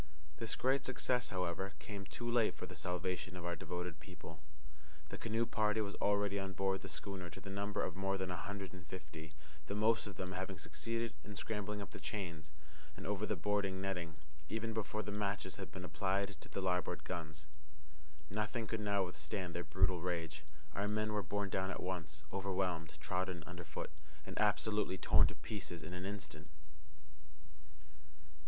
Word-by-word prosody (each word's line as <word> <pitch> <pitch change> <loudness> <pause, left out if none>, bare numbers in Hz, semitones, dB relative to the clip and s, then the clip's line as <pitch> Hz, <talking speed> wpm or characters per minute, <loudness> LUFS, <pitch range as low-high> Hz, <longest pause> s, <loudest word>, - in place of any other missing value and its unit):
This 115 -1 0
great 135 +2 +4
success, 125 -1 +2
however, 95 +1 0
came 100 -2 -5
too 120 - -4
late 120 -2 +5
for - - -4
the - - -8
salvation 90 0 -1
of 90 - -4
our 85 0 +1
devoted 90 -2 -3
people. 85 0 -9 0.7
The - - -3
canoe 115 +1 +2
party 110 -1 +3
were 105 -2 +1
already 100 -1 +4
on 95 0 -2
board 95 0 +2
the - - -5
schooner 95 -3 -3
to - - -8
the 95 - -6
number 100 +1 +1
of - - -1
more 95 +1 +2
than 95 -1 0
a - - 0
hundred 95 +3 -3
and 90 -3 -9
fifty, 80 -2 -7 0.3
the 100 - -1
most 110 +1 +5
of 100 - -6
them 95 0 -2
having 95 +1 -2
succeeded 115 +7 -1
in 105 0 -6
scrambling 105 0 -1
up - - -9
the - - -6
chains 85 -8 -3 0.5
and - - -6
over 105 +1 +1
the - - +2
boarding 100 -2 +2
netting 90 -4 -1 0.3
even 110 +2 0
before 110 0 0
the 105 - -3
matches 100 -2 0
had 95 -2 -5
been 90 -1 -5
applied 95 +5 +2
to - - -9
the 100 - -1
larboard 90 -1 +2
guns. 80 -4 -3 0.8
Nothing 105 +4 0 0.2
now 100 -1 +3
could - - +4
withstand 90 +2 -2
their 85 - 0
brute 90 +4 +4
rage. 85 -3 -1 0.3
Our 100 +1 +1
men 110 +1 +2
were 105 - +3
borne 100 +1 0
down 95 0 +2
at 95 - -2
once, 80 -5 -2
overwhelmed, 90 -5 +1
trodden 90 +1 0
under 90 -1 -5
foot, 75 -2 -4 0.3
and 95 - -5
absolutely 105 -1 +4
torn - - +7
to - - -4
pieces 90 -6 -4
in 90 - -5
an 90 +1 -3
instant. 75 -7 -5
95 Hz, 180 wpm, -39 LUFS, 90-105 Hz, 0.8 s, torn